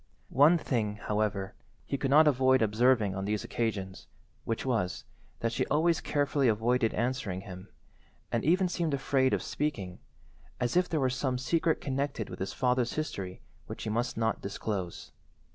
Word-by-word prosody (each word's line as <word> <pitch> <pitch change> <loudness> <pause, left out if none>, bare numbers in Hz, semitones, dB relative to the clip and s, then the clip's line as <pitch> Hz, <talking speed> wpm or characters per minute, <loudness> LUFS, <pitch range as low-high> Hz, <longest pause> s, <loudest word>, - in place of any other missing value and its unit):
One 150 +6 +6
thing, 110 -9 -1
however, 105 -2 -2 0.3
he - - -2
could 135 0 -1
not 155 +3 +6
avoid 130 -3 +4
observing 110 -1 +3
on 95 0 -3
these 105 0 -1
occasions, 100 -5 -3 0.4
which 115 +2 -2
was, 115 -9 -1 0.4
that 115 - 0
she 130 - 0
always 165 +3 +2
carefully 145 -2 +1
avoided 115 +2 +2
answering 120 -6 -1
him, 95 0 -10 0.6
and 115 - 0
even 180 +5 +3
seemed 170 -4 -1
afraid 135 -1 +2
of - - 0
speaking, 100 -12 -3 0.6
as 125 +3 -1
if 180 0 +3
there 160 - 0
were 130 -2 +2
some 130 0 -1
secret 160 +5 +1
connected 135 -4 -2
with - - -7
his 95 - -3
father's 125 -1 +1
history 95 -12 -4 0.3
which - - -7
she 110 - -3
must 120 +2 -1
not 110 -1 0
disclose. 100 -3 -4
125 Hz, 160 wpm, -30 LUFS, 105-140 Hz, 0.6 s, One